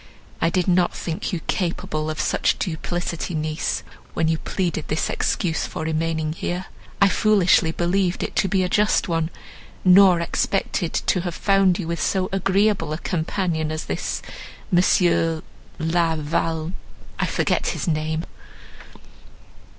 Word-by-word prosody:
I 165 - +3
did 180 +1 0
not 180 -1 +3
think 165 -2 -3
you 175 - -3
capable 155 -4 -2
of 155 - -4
so 155 - 0
much - - +2
duplicity, 175 0 -3
niece; 155 +1 -2 0.3
when 160 - +1
you 160 -1 0
pleaded 175 -5 -2
this 155 - -1
excuse 165 -3 -1
for - - -5
remaining 160 0 -1
here, 175 +2 -3 0.3
I 200 - +6
foolishly 190 -5 +3
believed 175 +2 0
it - - -5
to - - +3
be 190 0 +1
a - - +1
just 210 +3 +2
one, 165 -2 0 0.6
nor 185 -1 +7
expected 170 0 -1
to 180 - +1
have 175 -1 -4
found 195 -3 +3
with 180 - -4
you 170 - -1
so 185 +1 0
agreeable 195 -3 +1
a - - -2
companion 165 -2 -1
as 155 0 -4
this - - -3 0.5
M. 170 -2 +3 0.3
La 165 0 +1
Val—, 160 +2 -1 0.5
I - - +1
forget - - 0
his - - -2
name." 155 0 -1
170 Hz, 145 wpm, -23 LUFS, 160-185 Hz, 0.6 s, nor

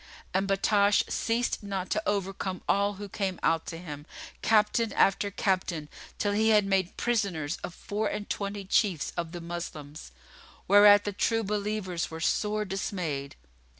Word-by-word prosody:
And 190 +1 +1
Battash 200 +1 +3
ceased 235 +2 0
not 195 -3 -4
to 215 - +1
overcome 195 -2 -2
all 200 +1 +2
who 205 +1 -7
came 195 -2 -3
out 165 -1 +1
to 165 - -5
him, 150 -3 -8 0.3
Captain 215 +1 +3
after 195 +1 +3
Captain 185 -6 -1 0.3
till 205 - 0
he 220 +2 +2
had 210 -2 +5
made 195 -2 0
prisoners 195 -11 -1
of 180 - -6
four 210 +1 -2
and 205 0 -4
twenty 200 0 -3
Chiefs 190 -4 +1
of 170 -2 -3
the 175 0 -6
Moslems, 155 - -7 0.6
whereat 205 +1 +8
the 205 - -3
True 225 +3 +1
Believers 205 -3 -2
were 160 - -7
sore 210 +5 0
dismayed. 175 -8 -3
195 Hz, 150 wpm, -28 LUFS, 175-210 Hz, 0.6 s, whereat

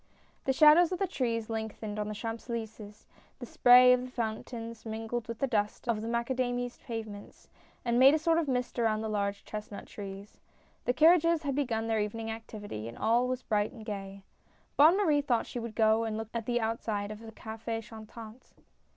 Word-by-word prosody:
The 270 - +2
shadows 310 +5 +6
of 365 - -1
the 390 - 0
trees 230 - -2
lengthened 220 -1 -5
on 210 - -2
the 215 - -5
Champs 225 +2 -5
Elys^es 220 -3 -7 0.2
— - - -32
the 245 - -6
spray 250 +1 +7
of 250 - +2
the 255 - -7
fountains 230 -1 -5
mingled 225 +1 -4
with 230 -1 -5
the 275 - 0
dust 210 -2 -2
of 225 -2 0
the 225 - -5
macadamised 245 +1 -2
pavements, 220 -3 -8 0.4
and 235 0 +2
made 270 +3 +8
a - - +3
sort 330 +1 +2
of 320 - -1
mist 250 -2 -2
around 220 -2 +1
the 220 - -3
large 200 -1 -2
chestnut 210 -1 -7
trees. 200 0 -9 0.5
The 245 - +2
carriages 335 +2 +5
had 280 -2 -1
begun 245 -5 -1
their 225 -1 0
evening 225 +2 -3
activity, 210 - -7
and 115 - -9
all 235 +3 +2
was 255 0 -3
bright 210 -1 0
and 225 -4 -11
gay. 195 -2 -6 0.5
Bonne 315 +6 +6
Marie 310 -8 +3
thought 245 -5 0
she 245 - -6
would 230 -2 -6
go 220 0 +3
and 220 -1 -3
look 220 0 -5
at 230 -2 -4
the 240 -1 +1
outside 220 -2 -2
of 215 - -8
the 225 0 -10
CafS 225 +1 -6
Chantant. 220 +2 -12
225 Hz, 200 wpm, -30 LUFS, 215-250 Hz, 0.5 s, made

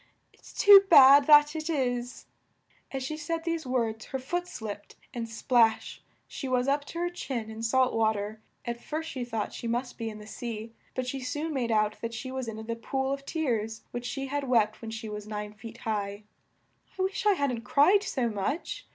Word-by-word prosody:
It's - - -16
too 405 -2 +9
bad, 280 -3 +9
that 295 0 +7
it 315 +1 -4
is!" 245 -5 -2 0.7
As 270 -1 -3
she 305 +4 -3
said 325 +2 -3
these 330 -4 -2
words 230 -3 -1
her 265 - -4
foot 350 +7 -3
slipped, 210 - -7 0.2
and 230 -2 -4
splash! 225 0 +2 0.3
she 275 - -6
was 250 0 +1
up 285 +1 +1
to 335 - -8
her 350 +1 0
chin 240 -10 -4
in 220 +1 -8
salt 255 +3 +2
wa 220 -1 +3
ter. 210 +1 -5 0.3
At 235 0 -4
first 320 +1 -4
she 255 -3 -4
thought 225 -3 -3
she 235 - -5
must 245 +2 -3
be 225 -1 -2
in 215 - -8
the 210 - -11
sea, 225 0 -6 0.2
but 255 - -2
she 270 +2 -3
soon 295 +5 -3
made 250 -4 -1
out 215 -1 +1
that 230 0 -4
she 260 +3 -6
was 260 -2 -4
in 220 0 -6
the 230 0 -3
pool 265 +3 -2
of 275 0 -7
tears 225 -9 -2
which 245 0 -4
she 270 +1 -3
had 285 +1 -2
wept 215 -3 +2
when 225 - -6
she 225 0 -6
was 210 0 -6
nine 210 -1 -5
feet 225 +2 -10
high. 205 -2 -3 0.7
"I - - -2
wish 390 +2 -1
I 415 - +6
hadn't 280 -8 -1
cried 290 - +4
so 260 - -1
much!" 225 - -3
245 Hz, 210 wpm, -28 LUFS, 225-285 Hz, 0.7 s, too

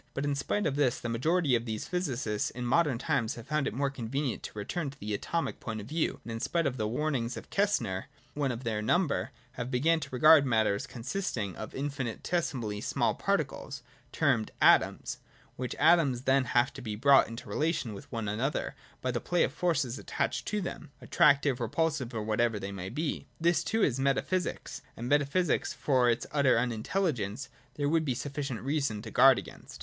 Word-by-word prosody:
But 140 - -1
in 145 - +1
spite 140 +9 -1
of 140 -1 0
this, 130 -3 +2
the 120 - -4
majority 150 +5 +1
of 115 -1 +2
these 110 -2 -4
physicists 130 - -1
in 125 0 -6
modern 140 0 +2
times 115 -1 0
have 120 - -9
found 150 -1 0
it - - -3
more 140 +1 0
convenient 135 +1 -3
to - - -9
return 145 +9 -3
to 135 - -13
the 105 +1 -4
Atomic 165 +10 -2
point 110 -2 -5
of 100 - -7
view, 155 +7 -1
and 115 - -6
in 115 - -4
spite 170 +7 0
of 130 -2 -1
the 110 -2 -1
warnings 125 -1 -1
of - - -10
Kastner, 195 - 0 0.3
one 140 -3 0
of 120 +1 -6
their 110 -3 -1
number, 165 - +1 0.2
have 125 0 -5
begun 155 +6 +2
to 150 - -6
regard 155 +3 +7
Matter 110 -6 +2
as 100 - -4
con 120 - -9
sisting 125 - -2
of 110 - -8
infinitesimally 135 -4 -2
small - - +1
particles, - - -2 0.3
termed 110 -2 +1
' - - -34
atoms - - -1
' - - -29
— - - -32
which 125 -1 -4
atoms 150 -6 +4
have - - -22
then 135 0 +3 0.3
to - - -9
be 110 -3 -4
brought 135 +5 +5
into 115 +2 -8
relation 155 -8 -1
with 100 - -11
one 115 -3 -3
another 120 +8 -1 0.3
by 130 - 0
the 120 - -2
play 175 -1 +2
of 135 - -1
forces 145 -7 0
attaching - - -2
to 210 0 -1
them, 175 - -6
— - - -35
attractive, 140 -5 +3
repulsive, 135 +1 -1
or 110 -2 -3
whatever 110 +1 +1
they 100 0 -5
may 95 -1 -5
be. 155 +7 -3
This 170 +1 +2
too 225 -1 0
is 135 -2 +1
meta 135 0 +2
physics; 185 -1 -3 0.2
and 120 - -4
metaphysics 145 +4 +1
which, - - -20
for 130 -4 +3
its 115 - 0
utter 140 -5 +3
unintelligence, 120 - -1 0.3
there 145 -1 -1
would 160 +2 +2
be 130 -5 -1
sufficient 140 -3 -4
reason 135 -6 -1
to 110 - -8
guard 135 -1 +7
against. - - -9
130 Hz, 205 wpm, -30 LUFS, 115-150 Hz, 0.3 s, regard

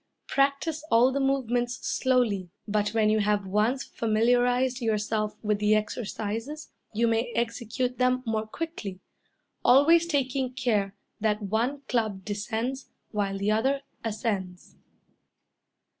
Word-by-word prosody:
Practice 280 +3 +1
all 240 +3 +5
the 280 - -1
movements 250 -3 0
slowly; 235 -8 +1 0.2
but 210 0 +1
when 215 0 +2
you 215 - +3
have 205 -1 +1
once 215 +7 +1
familiarized 245 +3 +1
yourself 215 -1 0
with 210 -1 +1
the 210 +1 +4
exercises 225 +6 -3 0.2
you 230 +2 +1
may 230 +1 +1
execute 235 +2 -2
them 255 0 +2
more 220 -1 -1
quickly, 215 - -5 0.6
always 325 +6 +6
taking 265 -4 0
care 215 -6 0 0.2
that 210 0 0
one 235 +8 -1
club 215 -6 -1
descends 225 +5 -3 0.2
while 200 -2 -1
the 200 +2 0
other 270 +6 +1 0.2
ascends. 205 -5 -3
230 Hz, 120 wpm, -27 LUFS, 210-255 Hz, 0.6 s, always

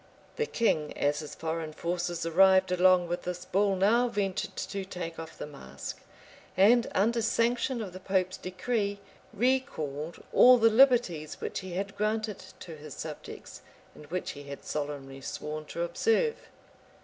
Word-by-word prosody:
The 460 - 0
king, 155 - 0
as 145 +1 +1
his 150 -1 -7
foreign 160 -1 -3
forces 175 +1 -2
arrived 190 +2 +5
along 180 -1 +4
with 175 +1 -2
this 180 0 -5
bull 200 0 +2
now 220 +6 +3
ventured 200 -5 -2
to 195 -1 -4
take 175 -3 -6
off 165 -1 -8
the - - -5
mask; 145 -2 -8 0.6
and, 230 +5 +5
under 230 +4 +2
sanction 235 +2 +1
of 190 -4 -8
the 185 - -8
pope's 185 -1 0
decree, 200 +2 -2 0.3
recalled 170 - -1
all 250 0 +8
the 225 -1 +5
liberties 230 - +3
which - - -3
he 185 -2 -7
had 195 +2 -3
granted 215 0 -1 0.2
to 165 -3 -8
his 150 -2 -10
subjects, - - -8 0.3
and 150 - -13
which 180 +4 -3
he 145 - -9
had 140 0 -9
solemnly 140 -2 -4
sworn 150 +2 -5
to 170 - -4
observe. 455 - +1
185 Hz, 155 wpm, -29 LUFS, 160-220 Hz, 0.6 s, all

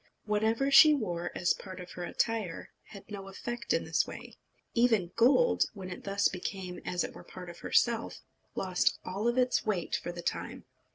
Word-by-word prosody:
Whatever 220 +6 +1
she 300 +2 +9
wore 175 -9 -2
as 175 - +2
part 185 -2 -9
of 180 0 -9
her 180 - -6
attire 215 -1 -2
had 200 - -12
no 195 -1 -6
effect 235 +5 -5
in - - +2
this - - +1
way. - - -9 0.4
Even 225 -7 +3
gold, 280 - +4
when 185 -2 -7
it 180 - -8
thus 200 0 +2
became 180 0 -5
as 180 -1 -1
it - - -5
were - - -11
a - - -15
part 180 -1 -9
of 175 - -14
herself, 235 -1 +1 0.3
lost 185 -2 +1
all 200 +5 -2
its 250 +1 +2
weight 195 -6 -1
for 175 - -4
the 175 0 -8
time. - - -4
200 Hz, 185 wpm, -30 LUFS, 180-235 Hz, 0.4 s, she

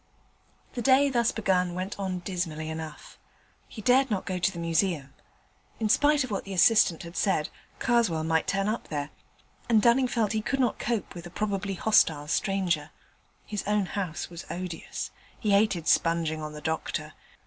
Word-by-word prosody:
The 240 - -3
day 270 +3 +5
thus 235 -2 +2
begun 180 -4 0
went 185 +3 -4
on 185 -2 -2
dismally 170 -4 -3
enough. 160 -1 -8 0.5
He 215 - -10
dared 260 +3 +4
not 200 -4 -1
go 185 -2 -2
to 190 - +2
the 180 - -10
Museum: 165 -4 0 0.7
in 220 -2 0
spite 290 +4 +4
of 255 - -6
what 200 - -2
the 195 -1 -6
assistant 185 -2 +4
had 170 +1 -10
said, 190 -7 +1 0.3
Karswell 230 -10 +1
might 160 0 +1
turn 195 +1 0
up 220 +2 -2
there, 145 -1 -4 0.6
and 225 -2 +5
Dunning 245 +4 +4
felt 230 -4 0
he 220 - 0
could 270 +5 -2
not 245 -3 +1
cope 235 -3 -2
with 175 0 -8
a - - -10
probably 200 +1 -2
hostile 160 -8 +3
stranger. 175 -4 0 0.6
His 210 -2 -3
own 210 -1 +2
house 185 -4 -4
was 170 -1 -10
odious; 180 -2 -5 0.3
he 210 - 0
hated 200 -5 +2
sponging 165 -2 +2
on 150 0 -6
the 150 - -8
doctor. 160 0 -3
190 Hz, 175 wpm, -27 LUFS, 165-220 Hz, 0.7 s, day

